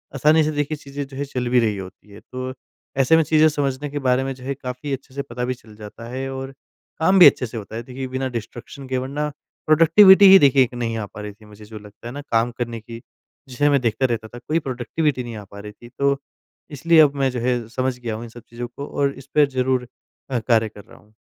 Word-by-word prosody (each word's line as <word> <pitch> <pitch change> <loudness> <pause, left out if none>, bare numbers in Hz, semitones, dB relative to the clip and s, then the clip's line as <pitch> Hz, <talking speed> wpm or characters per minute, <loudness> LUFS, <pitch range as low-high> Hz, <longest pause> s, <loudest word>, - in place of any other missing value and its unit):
आसानी 155 +4 +4
से 155 - 0
देखिए 145 +1 -2
चीज़ें 140 0 -7
जो 135 -1 -11
है 140 - -2
चल 125 -3 -4
भी 125 0 +4
रही 110 -3 0
होती 95 +2 -11
है। 100 - -12
तो 130 0 -5 0.4
ऐसे 135 +4 +4
में 165 - +4
चीज़ें 155 +1 +4
समझने 145 -1 -2
के 145 +1 -4
बारे 130 -1 +1
में 135 0 -3
जो 125 - -14
है 140 - -2
काफ़ी 130 +1 -6
अच्छे 135 0 -7
से 140 - -3
पता 125 -3 -5
भी 130 - -1
चल 110 -4 -17
जाता 110 +2 -10
है 130 +2 -4
और 135 0 -6 0.5
काम 185 +4 +4
भी 180 - +10
अच्छे - - +3
से 115 0 -7
होता 110 0 -8
है। 115 - -5
देखिए 130 +2 -6
बिना 130 +1 -3
डिस्ट्रैक्शन 120 +3 -8
के 130 - -1
वरना, 140 +4 -3 0.4
प्रोडक्टिविटी 180 +6 +7
ही 195 - +10
देखिए 135 -3 +5
एक 125 - -5
नहीं 115 -2 -3
आ 110 - -3
पा 105 - -11
रही 105 0 -6
थी 105 +1 -20
मुझे 105 0 -14
जो 110 0 -10
लगता 105 +2 -13
है 120 - -7
ना, 145 - -6
काम 120 -3 0
करने 120 -1 -4
की। 115 +1 -10 0.5
जिसे 145 +4 +1
मैं 140 -2 +3
देखता 115 +2 0
रहता 115 -3 -2
था 120 - -12
कोई 160 +2 +1
प्रोडक्टिविटी 130 +1 -2
नहीं 120 -1 -7
आ 105 - -8
पा 100 - -10
रही 105 +1 -8
थी 120 +3 -15
तो 140 0 +2 0.5
इसलिए 160 +3 +3
अब 145 -2 +4
मैं 135 -1 +1
जो 125 - -4
है 120 -1 -1
समझ 130 +1 -2
गया 115 -3 -4
हूँ 110 - -7
इन 120 - -9
सब 120 +1 -13
चीज़ों 120 +1 -6
को 130 +4 -8
और 140 -1 -1
इस 135 0 -13
पे 150 -1 +6
ज़रूर 130 -2 -1 0.4
अ, 130 -3 0
कार्य 110 -1 +1
कर 105 -1 -14
रहा - - -17
हूँ। 105 +1 -25
130 Hz, 260 wpm, -21 LUFS, 115-140 Hz, 0.5 s, भी